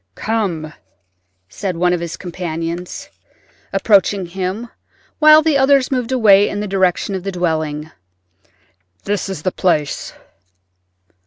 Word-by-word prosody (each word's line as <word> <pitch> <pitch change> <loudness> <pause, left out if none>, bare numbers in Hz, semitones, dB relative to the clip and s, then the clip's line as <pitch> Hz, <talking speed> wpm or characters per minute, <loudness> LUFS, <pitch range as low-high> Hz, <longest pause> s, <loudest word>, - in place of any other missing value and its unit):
"Come," 180 -9 -2 0.7
said 185 - -4
one 180 +1 +2
of 175 - 0
his 170 -1 -5
companions, 170 -1 -5 0.6
approaching 195 -1 +2
him, 190 +6 -4 0.5
while 310 0 +7
the 300 -3 +2
others 270 0 +3
moved 250 -2 -1
away 205 -5 +5
in 205 - -4
the 210 - -3
direction 190 0 0
of 190 - -3
the 195 +2 -4
dwelling—"this 145 - -6
is 185 -6 -6
the 185 - 0
place." 155 -7 -1
185 Hz, 115 wpm, -18 LUFS, 160-205 Hz, 0.7 s, while